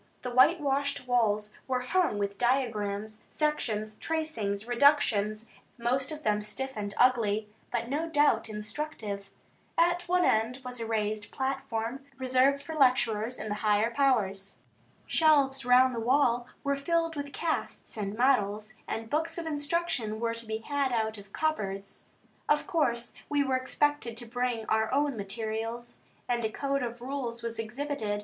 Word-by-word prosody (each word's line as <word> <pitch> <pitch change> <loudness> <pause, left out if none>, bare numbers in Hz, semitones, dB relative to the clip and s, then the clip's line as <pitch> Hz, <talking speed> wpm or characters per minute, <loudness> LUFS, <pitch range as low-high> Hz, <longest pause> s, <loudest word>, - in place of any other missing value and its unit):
The 250 - -3
whitewashed 280 0 +3
walls 215 -4 +1
were 255 -1 0
hung 335 - +1
with 200 -1 -2
diagrams, 215 -4 0
sections, 215 -9 -1
tracings, 230 -11 -2
reductions, 235 -5 +3 0.3
most 255 +4 0
of 310 0 -6
them 210 -2 +2
stiff 265 +5 -4
and 205 -1 -3
ugly, 220 -4 +3 0.2
but 235 -1 -1
no 305 +6 -2
doubt 290 -8 +3
instructive. 210 -2 -5 0.5
At 350 +1 +2
one 360 0 +3
end 225 +4 +2
was 250 -1 -5
a 230 - -3
raised 215 -1 -1
platform, 265 -2 -3
reserved 260 +2 +3
for 320 - -6
lecturers 250 -5 +2
and 215 - -5
the 210 - -3
higher 215 +2 +3
powers. 205 -8 +1 0.5
Shelves 285 -5 +3
round 250 +1 +6
the 235 - -2
wall 245 0 +2 0.2
were 280 -1 +1
filled 330 +3 0
with 285 -1 -4
casts 325 +2 -3
and 205 -1 -3
models, 215 -4 +2
and 225 0 -3
books 325 +6 -1
of 340 - -4
instruction 290 -7 -1
were 230 0 0
to 230 -1 -3
be 220 0 -2
had 275 +3 -1
out 220 -2 -1
of 200 0 -15
cupboards. 200 -11 -2 0.4
Of 295 - +3
course 240 -7 0 0.2
we 290 -1 +2
were 265 -1 +1
expected 255 -2 0
to 240 - -4
bring 245 -1 -2
our 220 0 +1
own 285 0 +1
materials, 225 +3 -4 0.3
and 240 -1 0
a 220 - +1
code 275 +3 -1
of 240 -1 -4
rules 250 -3 -3
was 230 -1 -3
exhibited. 225 -2 -2
245 Hz, 155 wpm, -29 LUFS, 220-280 Hz, 0.5 s, round